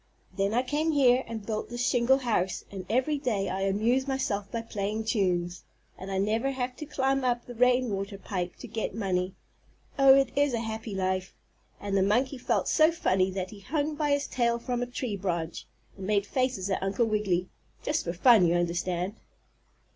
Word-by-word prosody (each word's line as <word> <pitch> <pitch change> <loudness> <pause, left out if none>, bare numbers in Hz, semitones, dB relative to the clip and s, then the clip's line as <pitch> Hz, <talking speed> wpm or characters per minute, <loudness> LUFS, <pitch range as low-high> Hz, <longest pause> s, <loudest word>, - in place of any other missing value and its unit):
Then 195 +1 +1
I 250 - +3
came 300 +5 0
here, 260 -3 +4
and 220 -3 -6
built 215 -1 -3
this 240 +1 -2
shingle 260 0 +4
house 220 -8 -1
and 190 -2 -7
every 260 +6 +1
day 210 -8 -1
I 190 +1 -2
amuse 220 +7 +1
myself 210 -7 -2
by 230 -1 -3
playing 215 0 -3
tunes, 180 -5 0 0.3
and 190 - -8
I 195 - -2
never 220 +7 +1
have 255 -1 -3
to 305 - -7
climb 270 -1 0
up 245 -1 0
the 245 - -8
rainwater 235 -5 +1
pipe 185 -3 -4
to - - -10
get 220 -3 -3
money. 185 -3 -1 0.6
Oh, 270 -1 +8
it 275 -1 +2
is 285 -3 +2
a - - -1
happy 220 -2 -5
life," 185 0 -1 0.4
and 200 -1 -3
the 195 - +4
monkey 250 +7 +1
felt - - 0
so 310 +1 +5
funny 190 - +1
that 185 -1 -4
he 210 - -11
hung 295 +7 -1
by 295 0 -1
his 285 0 +2
tail 235 -2 +1
from 245 +1 -3
a 245 - -1
tree 245 -3 -3
branch, 170 -4 -3 0.3
and 190 -1 -7
made 205 -1 +2
faces 255 -6 -1
at - - 0
Uncle 195 +5 +1
Wiggily 200 -5 0 0.3
just 300 - -1
in 170 - -1
fun, 205 0 +6
you 170 - +2
understand. 175 +2 -1
220 Hz, 190 wpm, -28 LUFS, 195-255 Hz, 0.6 s, Oh